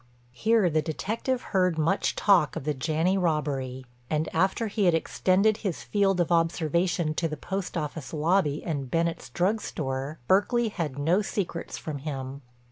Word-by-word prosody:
Here 220 - +3
the 155 -2 +2
detective 220 - -2
heard 180 -3 +3
much 160 +5 +1
talk 175 -9 +4
of - - -4
the 150 +1 0
Janney 160 +7 +1
robbery, 140 -6 -1 0.2
and, 155 +1 0
after 190 +7 +1
he 210 -1 0
had 175 -2 +5
extended 195 +5 +2
his 195 -7 -3
field 195 -3 +1
of 175 0 +1
observation 165 0 +1
to 165 +1 0
the 155 -1 -5
post 190 +3 -4
office 150 -3 -4
lobby 155 -1 +1
and 140 -6 -3
Bennett's 165 -4 -1
drug 190 - +1
store, 135 +1 -4
Berkeley 225 +4 +3
had 155 -9 -4
no 165 +8 +2
secrets 190 -4 -3
from 150 -3 -5
him. 135 -1 -5
165 Hz, 160 wpm, -27 LUFS, 150-190 Hz, 0.2 s, had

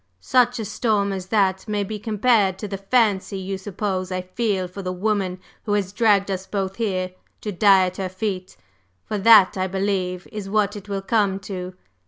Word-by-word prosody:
Such 245 - +2
a 220 - -3
storm 205 -2 0
as 185 -1 -5
that 190 -2 +1
may 210 -1 0
be 210 +2 -5
compared 210 -3 +2
to 210 - -5
the 195 -1 -5
'fancy' 200 -2 +1
you 190 0 -4
suppose 190 -1 -3
I 185 0 -2
feel 190 -1 -1
for 185 +3 -8
the 185 -1 -3
woman 185 -1 -1 0.3
who 205 - 0
has 200 -2 -1
dragged 205 -3 +3
us 190 0 -4
both 195 -1 -3
here 185 -5 -1 0.3
to 210 - -3
die 195 0 +5
at 180 0 -5
her 190 -1 -2
feet 185 -1 -4 0.5
for 210 - -3
that, 200 -2 +7
I 185 - +1
believe, 190 -1 -2
is 205 -2 -6
what 210 0 +1
it 205 0 -9
will 195 -1 -3
come 200 -1 +1
to. 185 -1 -6
195 Hz, 195 wpm, -23 LUFS, 185-210 Hz, 0.5 s, that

